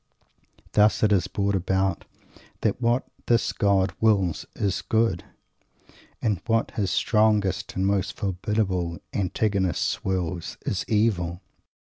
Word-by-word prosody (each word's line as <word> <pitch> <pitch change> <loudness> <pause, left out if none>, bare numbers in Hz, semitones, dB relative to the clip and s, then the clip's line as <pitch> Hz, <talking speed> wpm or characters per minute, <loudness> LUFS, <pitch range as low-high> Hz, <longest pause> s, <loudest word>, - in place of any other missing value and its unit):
Thus 105 +1 +3
it 105 - +4
is 100 -3 +3
brought 100 0 -1
about 95 -1 0 0.6
that 110 +2 0
what 120 +2 +2 0.2
this 120 -1 +2
God 100 -3 +2
wills 100 -6 +2
is 100 -3 -1
"Good," 110 -6 +1 1.0
and 105 -6 0
what 115 -1 +1
his 100 -3 -1
strongest 105 -2 +1
and 95 - 0
most 100 0 0
formidable 95 -3 -1 0.2
antagonist 95 -1 0
wills 90 -2 -2
is 95 - -1
"Evil." 95 -6 +1
100 Hz, 115 wpm, -25 LUFS, 95-110 Hz, 1.0 s, it